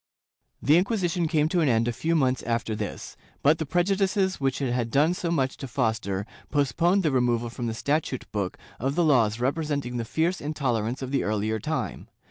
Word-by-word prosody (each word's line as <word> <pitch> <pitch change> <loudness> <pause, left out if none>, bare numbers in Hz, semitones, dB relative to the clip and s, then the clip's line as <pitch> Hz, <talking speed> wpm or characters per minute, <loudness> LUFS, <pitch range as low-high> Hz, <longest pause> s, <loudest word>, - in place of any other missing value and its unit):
^ - - -7
The 150 +3 +7
Inquisition 180 -3 +1
came 155 -1 +2
to 180 - +1
an 150 - +3
end 115 -1 +2
a 120 - 0
few 165 +8 0
months 130 -4 +2
after 115 -2 -1
this, 105 -1 -5 0.3
but 150 +3 +4
the 160 - -2
prejudices 190 +1 +1
which 135 -1 0
it 135 -3 -1
had 120 -2 -1
done 150 +7 +3
so 180 -2 -3
much 135 -6 0
to 135 - -6
foster 110 -6 -1 0.2
postponed 165 +7 +2
the 155 - +2
removal 120 -2 +1
from 120 0 -4
the 110 - -3
statute 140 0 -1
book 100 -3 -2 0.2
of 135 +4 -1
the 175 - +3
laws 120 -7 +3
representing 140 -2 -1
the 115 - -1
fierce 165 +10 0
intolerance 130 -5 -1
of 130 - -5
the 140 - +1
earlier 110 +1 -1
time. 155 +8 -3
135 Hz, 200 wpm, -26 LUFS, 115-160 Hz, 0.3 s, The